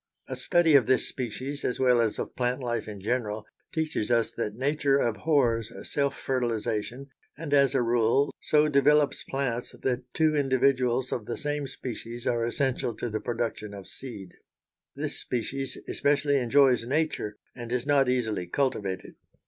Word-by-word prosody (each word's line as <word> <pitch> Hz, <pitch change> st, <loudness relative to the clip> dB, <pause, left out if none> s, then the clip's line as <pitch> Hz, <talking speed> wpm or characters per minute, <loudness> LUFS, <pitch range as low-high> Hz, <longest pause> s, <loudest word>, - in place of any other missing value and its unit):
A -, -, -4 dB
study 175 Hz, -3 st, +3 dB
of 135 Hz, -6 st, +6 dB
this 130 Hz, -, +3 dB
species, 130 Hz, +3 st, -4 dB
as 125 Hz, -, -1 dB
well 125 Hz, -2 st, +4 dB
as 110 Hz, -2 st, 0 dB
of -, -, -5 dB
plant 125 Hz, +1 st, 0 dB
life 120 Hz, -1 st, -2 dB
in 105 Hz, -2 st, -7 dB
general, 110 Hz, -1 st, -2 dB, 0.3 s
teaches 155 Hz, -9 st, -1 dB
us 115 Hz, -1 st, +2 dB
that 105 Hz, -3 st, -4 dB
nature 140 Hz, +2 st, +2 dB
abhors 120 Hz, -3 st, +1 dB, 0.2 s
self 140 Hz, -1 st, 0 dB
fertilization 120 Hz, +1 st, -2 dB, 0.3 s
and, 150 Hz, -2 st, -4 dB
as 140 Hz, -2 st, +4 dB
a -, -, +3 dB
rule, 120 Hz, +4 st, +2 dB
so 150 Hz, 0 st, +3 dB
develops 150 Hz, 0 st, +3 dB
plants 125 Hz, -3 st, -3 dB
that 125 Hz, -1 st, -2 dB
two 155 Hz, -1 st, +3 dB
individuals 130 Hz, -2 st, +2 dB
of 110 Hz, -4 st, -3 dB
the 120 Hz, -, -3 dB
same 145 Hz, -2 st, -2 dB
species 120 Hz, -2 st, -6 dB
are 120 Hz, -1 st, +1 dB
essential 120 Hz, -1 st, -1 dB
to 115 Hz, +1 st, -4 dB
the 110 Hz, 0 st, -2 dB
production 115 Hz, -3 st, -3 dB
of 100 Hz, -1 st, -9 dB
seed. 105 Hz, -9 st, -8 dB, 0.6 s
This -, -, -3 dB
species 135 Hz, +3 st, -3 dB
especially 145 Hz, 0 st, +2 dB
enjoys 130 Hz, -1 st, +4 dB
nature, 130 Hz, -6 st, -1 dB, 0.2 s
and 120 Hz, -1 st, -7 dB
is 125 Hz, 0 st, -1 dB
not 140 Hz, -2 st, +3 dB
easily 110 Hz, -8 st, 0 dB
cultivated. 100 Hz, -5 st, -2 dB
125 Hz, 155 wpm, -27 LUFS, 115-140 Hz, 0.6 s, of